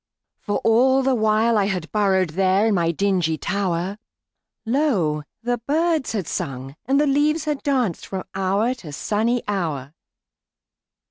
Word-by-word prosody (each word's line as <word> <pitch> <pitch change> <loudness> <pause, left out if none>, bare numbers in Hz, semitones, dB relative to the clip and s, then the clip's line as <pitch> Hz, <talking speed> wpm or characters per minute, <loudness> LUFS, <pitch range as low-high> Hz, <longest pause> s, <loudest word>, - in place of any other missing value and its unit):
For 205 - -2
all 260 +4 +4
the 265 0 +2
while 220 0 +2
I 200 - +2
had 180 -5 -3
burrowedThere 190 0 +2
in - - +2
my 170 -3 +1
dingy 170 -2 0
tower, 195 0 -2 0.7
Lo! 220 - +1 0.2
the 245 0 -1
birds 315 -3 +1
had 200 -6 -2
sung 135 +1 -4
and 275 +2 +3
the 300 - +3
leaves 295 +3 +1
had 300 -2 -2
dancedFrom 230 - -1
hour 195 +5 +1
to 195 -12 -10
sunny 225 +9 0
hour. 155 -9 -3
205 Hz, 135 wpm, -22 LUFS, 180-255 Hz, 0.7 s, all